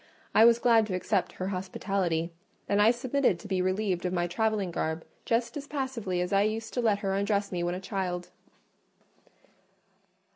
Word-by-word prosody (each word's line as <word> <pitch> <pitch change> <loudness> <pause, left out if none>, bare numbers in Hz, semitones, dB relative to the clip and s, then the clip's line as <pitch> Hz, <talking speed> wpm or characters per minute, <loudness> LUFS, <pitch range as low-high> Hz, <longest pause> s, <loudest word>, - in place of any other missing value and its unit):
I 220 - +7
was 235 0 +7
glad 230 -2 +4
to 185 - -2
accept 185 +1 0
her 185 +1 -4
hospitality; 185 -3 -1 0.4
and 205 0 +3
I 215 - +7
submitted 250 -3 +1
to 205 - -11
be 190 -2 0
relieved 185 -1 0
of 180 - -1
my 175 -1 0
travelling 205 +1 0
garb 160 -1 -2 0.2
just 235 +5 0
as 290 0 -7
passively 250 -11 -2
as 180 +2 -2
I 195 - +5
used 220 +2 -1
to 245 - 0
let 210 -3 +2
her 195 - +1
undress 200 0 0
me 180 -2 -2
when 175 +1 -1
a - - -4
child. 185 -3 -3
200 Hz, 180 wpm, -29 LUFS, 180-225 Hz, 0.4 s, I